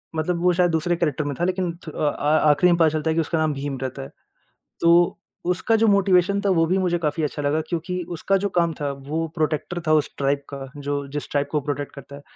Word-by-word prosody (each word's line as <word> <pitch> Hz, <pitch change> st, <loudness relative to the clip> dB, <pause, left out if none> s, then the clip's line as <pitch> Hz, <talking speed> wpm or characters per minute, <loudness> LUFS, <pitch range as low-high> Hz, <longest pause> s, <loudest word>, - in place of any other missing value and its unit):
मतलब 170 Hz, +2 st, -1 dB
वो 180 Hz, -, +4 dB
शायद 175 Hz, 0 st, +2 dB
दूसरे 165 Hz, +2 st, +1 dB
कैरेक्टर 155 Hz, -3 st, -1 dB
में 145 Hz, -2 st, -3 dB
था 175 Hz, -, 0 dB
लेकिन 185 Hz, -1 st, -1 dB, 0.2 s
थु -, -, -5 dB
अ 150 Hz, -, 0 dB
अ, 150 Hz, +2 st, +1 dB
आख़िरी 160 Hz, +5 st, +4 dB
में -, -, +2 dB
पता 160 Hz, -, +5 dB
चलता 155 Hz, +1 st, -1 dB
है -, -, +2 dB
कि 165 Hz, -, +3 dB
उसका 165 Hz, +1 st, -2 dB
नाम 155 Hz, -1 st, +1 dB
भीम 140 Hz, 0 st, -4 dB
रहता 130 Hz, +1 st, -4 dB
है। -, -, -9 dB, 0.7 s
तो 170 Hz, +1 st, +4 dB, 0.3 s
उसका 205 Hz, +5 st, +1 dB
जो 225 Hz, 0 st, +3 dB
मोटिवेशन 200 Hz, -1 st, +3 dB
था 200 Hz, -, 0 dB
वो 165 Hz, -3 st, +3 dB
भी 185 Hz, -, +1 dB
मुझे 180 Hz, -2 st, +1 dB
काफ़ी 155 Hz, 0 st, -1 dB
अच्छा 145 Hz, 0 st, -2 dB
लगा 150 Hz, +2 st, +1 dB
क्योंकि 180 Hz, +2 st, -3 dB, 0.2 s
उसका 195 Hz, +4 st, +1 dB
जो 200 Hz, +1 st, -1 dB
काम 170 Hz, -2 st, +2 dB
था 145 Hz, -, -1 dB, 0.2 s
वो 160 Hz, +2 st, -1 dB
प्रोटेक्टर 160 Hz, +2 st, -1 dB
था 155 Hz, -, +4 dB
उस 150 Hz, -2 st, +2 dB
ट्राइब 140 Hz, 0 st, +1 dB
का 135 Hz, -1 st, -6 dB
जो 145 Hz, 0 st, -3 dB
जिस 145 Hz, -, -4 dB
ट्राइब 145 Hz, -1 st, 0 dB
को 155 Hz, -, +1 dB
वो -, -, -11 dB
प्रोटेक्ट 145 Hz, -1 st, -3 dB
करता 140 Hz, 0 st, -10 dB
है। 140 Hz, -, -11 dB
160 Hz, 255 wpm, -23 LUFS, 145-175 Hz, 0.7 s, पता